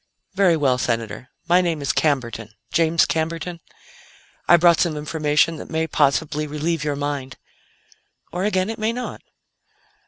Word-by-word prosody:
"Very 185 -4 +3
well, 130 -4 +2
Senator. 115 +1 -3 0.2
My 180 +2 +5
name 170 -3 -1
is 140 - -1
Camberton, 120 -7 -1 0.2
James 165 0 +3
Camberton. 165 +2 -3 0.9
I 175 - +7
brought 170 -1 +5
some 165 -4 +1
information 150 +1 +1
that - - -9
may 160 0 0
possibly 150 0 +1
relieve 155 +1 -2
your 150 -1 -1
mind 140 -2 -4 0.9
or, 175 +3 -3
again, 195 0 0
it 225 - -8
may 220 +1 0
not." 250 +1 -6
160 Hz, 145 wpm, -22 LUFS, 145-170 Hz, 0.9 s, I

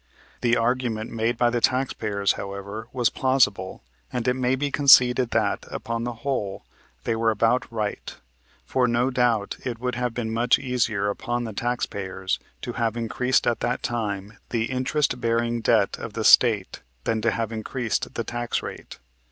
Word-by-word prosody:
The 120 0 +3
argument 115 -2 -1
made 115 +1 0
by 120 0 +3
the 120 -1 0
taxpayers, 105 -7 +1
however, 100 +3 -6
was 120 -3 +1
plausible 120 - +1 0.3
and 125 0 -2
it 125 - +4
may 130 0 +1
be 140 +1 -2
conceded 125 -3 +6
that, - - 0
upon 115 0 -3
the 120 - -3
whole, 105 -8 -2 0.4
they 115 - 0
were 115 0 +2
about 115 +3 +1
right; 105 -3 -4 0.5
for 125 -1 +1
no 120 +2 +1
doubt 120 -5 +1
it 125 -3 -3
would 125 +1 -2
have 125 -1 -2
been 110 -2 -2
much 120 +2 +3
easier 110 -6 0
upon 120 +2 -3
the 110 -2 -5
taxpayers 100 -5 -2 0.2
to 120 - -4
have 115 -1 -1
increased 125 +3 +1
at 120 - +1
that 125 - -2
time 105 -3 -3
the 115 0 -1
interest 130 0 0
bearing 115 0 0
debt 110 -3 +2
of 115 - -6
the 115 - -3
State 110 -4 +5 0.2
than 110 +5 0
to 115 - +2
have 115 0 -2
increased 115 +1 -3
the - - -1
tax 120 0 -3
rate. - - -8
115 Hz, 170 wpm, -24 LUFS, 110-125 Hz, 0.5 s, conceded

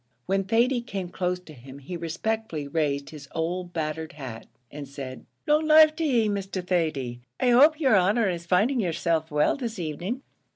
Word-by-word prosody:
When 195 0 0
Thady 240 +5 +2
came 195 -6 -5
close 180 0 -2
to 160 -4 -13
him 135 +1 -12
he 140 +6 -7
respectfully 170 -1 -3
raised 140 -2 -1
his 145 -3 -10
old 175 +2 -2
battered 160 -1 -3
hat, 130 -6 -8 0.2
and 145 -1 -7
said 135 -2 -8 0.2
"Long 305 0 +2
life 310 0 +7
to 330 - -1
ye, 240 -8 +2
Mr. 195 -2 -3
Thady; 155 -9 -1 0.2
I 250 - +3
hope 295 +6 +6
yer 270 -6 +3
honer 200 +4 +3
is 170 -2 -3
finding 215 +9 +2
yerself 165 -4 0
well 150 -1 +2
this 235 -5 -5
evening." 175 - -4
180 Hz, 175 wpm, -26 LUFS, 155-225 Hz, 0.2 s, life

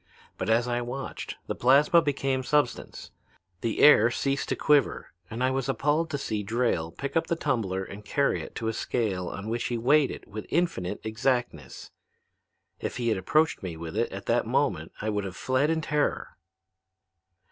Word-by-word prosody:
But - - -3
as 115 +2 +3
I 120 0 0
watched, 125 +3 -5
the - - -2
plasma 145 +6 +5
became 135 -3 0
substance. 145 -1 -1 0.5
The 115 - -1
air 120 -6 +8
ceased 135 +3 -1
to - - +1
quiver 145 -4 +2 0.2
and 115 +3 -3
I 130 - +2
was 135 0 -2
appalled 150 +6 +1
to 145 - -2
see 110 -6 -3
Drayle 110 -6 0
pick 140 +3 -4
up 165 - +2
the 170 - 0
tumbler 110 - -1
and 100 +2 -9
carry 140 +6 +1
it - - -10
to 115 - -3
a 110 - 0
scale 100 -7 -2
on 100 +2 -6
which 115 +1 -2
he 120 - -1
weighed 140 +4 +4
it - - -8
with 110 +1 -7
infinite 150 - -1
exactness. 110 - -2 0.9
If - - -4
he 120 -2 0
had 110 - +1
approached 155 - +2
me 85 -4 -5
with 80 0 -7
it - - 0
at - - -7
that - - +1
moment - - 0
I 110 - -1
would 105 -1 -1
have 95 -2 -6
fled 130 +3 +1
in 160 0 +1
terror. 150 -1 -1
120 Hz, 185 wpm, -27 LUFS, 110-140 Hz, 0.9 s, air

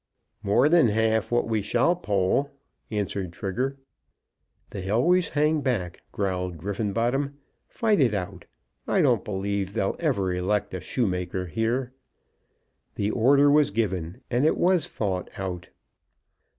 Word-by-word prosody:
"More 105 +6 +3
than 165 -4 +5
half 110 +1 +1
what 120 0 +1
we 110 -2 0
shall 120 - +2
poll," 105 - 0 0.4
answered 100 -3 -3
Trigger. 125 +9 -3 0.9
"They 95 -1 -5
always 165 - +3
hang 150 +1 +1
back," 105 -11 -2
growled 90 -3 -2
Griffenbottom. 115 - -1 0.3
"Fight 220 -4 +1
it 120 -7 +3
out. 90 -3 -5 0.4
I - - +2
don't - - +3
believe 100 -1 -2
they'll 95 - 0
ever 100 - 0
elect 95 +3 -1
a 95 - -4
shoemaker 90 -5 -2
here." 120 +7 -1 1.0
The 105 +1 -1
order 140 +5 +4
was 150 0 +4
given, 95 -1 -2
and 125 +2 +2
it 155 - +3
was 180 -3 +2
fought 95 -4 -3
out. 90 -2 -5
110 Hz, 130 wpm, -26 LUFS, 95-135 Hz, 1.0 s, than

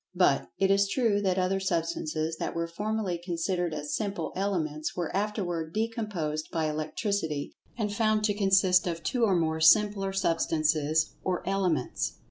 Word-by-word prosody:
But, - - +3
it 195 0 +3
is 200 0 +4
true 210 -2 +1
that 190 -2 +1
other 185 +1 +1
substances 165 -3 -2
that - - -3
were 170 0 0
formerly 205 0 -2
considered 175 0 -1
as 150 -1 -3
simple 205 -1 -3
elements 160 -6 -2
were 175 -1 -3
afterward 180 -6 -2
decomposed 210 -9 -2
by 160 -3 0
electricity, 155 0 -2 0.2
and 210 -3 -1
found 215 -1 +2
to 210 -1 +2
consist 190 -3 +3
of 165 -1 -3
two 240 +4 +1
or 195 -4 +2
more 160 -2 0
simpler 200 +3 +5
substances 160 -4 +1
or 185 -1 -2
elements. 185 -9 0
180 Hz, 150 wpm, -28 LUFS, 160-200 Hz, 0.2 s, simpler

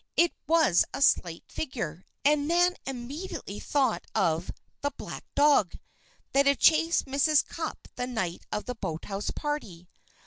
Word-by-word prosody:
It 340 0 +4
was 320 - +5
a - - -5
slight 170 - +2
figure, 185 - -5 0.2
and 290 0 +3
Nan 350 +2 +3
immediately 265 - -6
thought 265 -11 +1
of 165 -1 +1 0.3
"the 285 - 0
black - - -7
dog" 285 - +4 0.5
that 275 0 +4
had 280 -1 +4
chased 330 +1 +4
Mrs. 285 +2 +3
Cupp 325 -1 -6
the 250 - -2
night 190 -9 -3
of 210 - -3
the 250 - -3
boathouse 195 0 -4
party. 215 - -4
270 Hz, 140 wpm, -28 LUFS, 190-305 Hz, 0.5 s, was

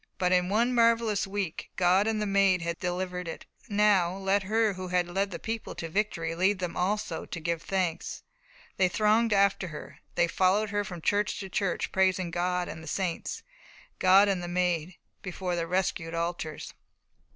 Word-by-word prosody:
But 180 0 +1
in 180 0 +3
one 235 +5 +2
marvellous 230 -3 +3
week 195 -4 -4
God 185 +3 +3
and 220 -1 0
the 210 - 0
Maid 195 -3 +3
had 170 0 -3
delivered 180 0 -3
it. 165 - -7 0.2
Now 200 -4 +3
let 195 +1 +1
her 215 +2 +1
who 185 0 -6
had 180 -1 +1
led 195 +3 -1
the - - -5
people 225 0 -5
to 165 - -5
victory 165 -3 -1
lead 190 +4 +2
them 180 -2 -4
also 185 -2 -1
to - - -6
give 165 0 -2
thanks. 185 -4 -2 0.5
They 185 -1 +3
thronged 215 +4 +2
after 195 -2 +3
her. 155 -3 -9 0.2
They 175 0 +3
followed 195 +4 +2
her 205 0 0
from 180 -5 -8
church 205 +3 0
to 195 - -7
church, 195 0 -1
praising 185 -2 +1
God 180 +1 -1
and 160 - -7
the 160 - -11
saints, 180 +1 -3 0.6
God 190 +2 +6
and 195 -3 0
the 175 - -5
Maid, 175 -1 -1 0.3
before 180 -1 -3
their 165 -1 -2
rescued 175 -2 -1
altars. 165 -2 -4
185 Hz, 180 wpm, -28 LUFS, 175-205 Hz, 0.6 s, God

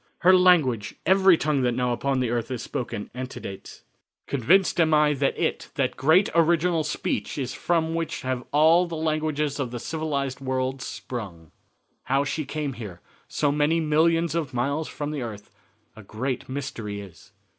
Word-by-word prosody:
Her 185 +2 +7
language 160 - +3
every 190 -1 +5
tongue 150 -3 0
that 125 -1 +1
now 125 -1 0
upon 135 +2 0
the 120 -2 0
earth 120 0 -2
is 125 -3 -4
spoken 120 -6 -5
antedates. 125 -6 -8 0.4
Convinced 175 - +2
am 160 -1 +4
I 150 0 +4
that 140 0 0
it 165 - -2
that 135 -4 0
great 160 +9 +4
original 170 0 +3
speech 150 - -3
is 130 -3 -3
from 165 -2 0
which 165 -1 -3
have 130 -1 -2
all 160 +4 +5
the 170 - -5
languages 155 -2 -1
of 130 -3 -1
the 120 - -5
civilized 140 -3 -3
world 130 0 -2
sprung." 95 - -7 0.5
"How 135 +2 +2
she 145 +2 -2
here 150 - -7
came, 125 - -5 0.3
so 145 -2 0
many 150 +3 +2
millions 165 +2 +2
of 155 -6 -2
miles 140 +6 -1
from 145 0 -5
the 150 -3 -4
earth, 105 -4 -7 0.4
a 110 - -11
great 125 +6 -4
mystery 115 -7 -5
is. 100 0 -13
140 Hz, 165 wpm, -25 LUFS, 125-160 Hz, 0.5 s, Her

